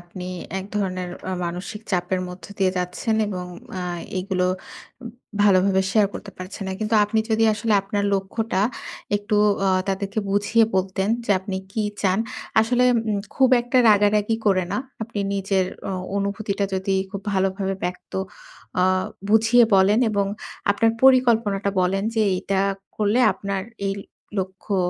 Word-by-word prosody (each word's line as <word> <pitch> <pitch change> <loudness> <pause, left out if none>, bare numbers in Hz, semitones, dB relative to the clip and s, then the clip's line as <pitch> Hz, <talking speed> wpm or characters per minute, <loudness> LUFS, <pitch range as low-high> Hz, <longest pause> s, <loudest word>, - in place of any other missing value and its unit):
আপনি 175 +1 -9 0.3
এক 190 - -6
ধরনের 185 -3 -2 0.2
অ - - -2
মানসিক 180 +5 -5
চাপের 180 +1 0
মধ্য 180 -1 -10
দিয়ে 190 -1 +3
যাচ্ছেন 180 +5 -1
এবং 185 -3 -4 0.3
অ্যা 185 -1 -4 0.3
এগুলো 185 -1 0 1.0
ভালোভাবে 190 -1 +4
শেয়ার 210 -2 +4
করতে 200 - -7
পারছেন 185 +2 -7
না। - - -2
কিন্তু 215 +1 0
আপনি 215 +2 0
যদি 220 0 +3
আসলে 215 +1 -1
আপনার 200 +1 -2
লক্ষ্যটা 195 +1 -1 0.5
একটু 205 +1 -1 0.3
অ - - +4 0.2
তাদেরকে 195 +2 -2
বুঝিয়ে 205 +3 +3
বলতেন 190 +1 0 0.2
যে, - - -3
আপনি 190 -1 -4 0.2
কি 220 - -1 0.2
চান। 190 0 +2 0.4
আসলে 245 +3 +2 0.3
উম 205 - 0 0.2
খুব 265 -1 +4
একটা 245 +1 -2
রাগারাগি 210 +1 +3
করে 185 -3 +3
না। - - 0 0.2
আপনি 220 -1 -5 0.2
নিজের 195 -1 +1 0.2
অ - - -2 0.3
অনুভূতিটা 200 0 -1
যদি 190 +1 0 0.2
খুব 200 0 -5
ভালোভাবে 195 0 0
ব্যক্ত 180 0 -5 0.7
অ - - +4 0.5
বুঝিয়ে 225 +3 +5
বলেন 195 +3 +5
এবং 200 -1 +1 0.4
আপনার 225 +3 +3
পরিকল্পনাটা 230 -7 +4
বলেন। 190 +2 +1
যে 220 - +3 0.2
এটা 195 +1 -1 0.4
করলে 215 +3 +2
আপনার 200 -1 -3 0.3
এই 195 - -1 0.4
লক্ষ্য, 190 +2 -3
200 Hz, 145 wpm, -23 LUFS, 190-215 Hz, 1.0 s, বুঝিয়ে